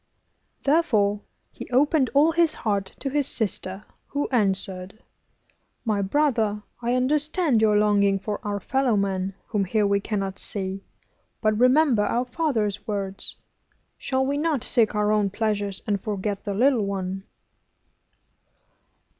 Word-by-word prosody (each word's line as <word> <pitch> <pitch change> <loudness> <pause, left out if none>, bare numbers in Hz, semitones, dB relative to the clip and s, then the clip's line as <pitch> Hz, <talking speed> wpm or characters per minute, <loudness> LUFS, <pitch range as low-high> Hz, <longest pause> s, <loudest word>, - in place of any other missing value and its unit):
Therefore 220 -10 +2 0.3
he - - -9
opened 275 +2 +3
all 300 +3 +5
his 335 -1 +2
heart 200 -3 -2
to - - -2
his 290 -1 +1
sister, 200 -4 -3 0.2
who 285 0 -2
answered: 195 -2 -1 0.8
'My 210 -3 +1
brother, 220 -3 +1 0.2
I 240 +1 0
understand 295 - +1
your 210 -1 +4
longing 200 -1 +3
for 205 +2 -4
our 205 -1 -2
fellow 255 +2 +1
men, 195 -1 -1
whom 210 -3 +1
here 210 +3 +1
we 200 0 +2
cannot 195 -2 -3
see. 195 -1 -2 0.6
But 215 -1 +2
remember 255 -2 +4
our 240 +4 0
father's 225 - -1
words. 195 -2 -4 0.6
Shall 265 0 0
we 285 +2 -1
not 300 -5 0
seek 220 -3 +2
our 210 0 +2
own 210 -2 +2
pleasures, 205 -2 -2
and 200 -2 -1
forget 205 -1 -3
the 200 -1 -2
little 245 0 +3
one? 195 -1 -3
210 Hz, 135 wpm, -25 LUFS, 200-260 Hz, 0.8 s, all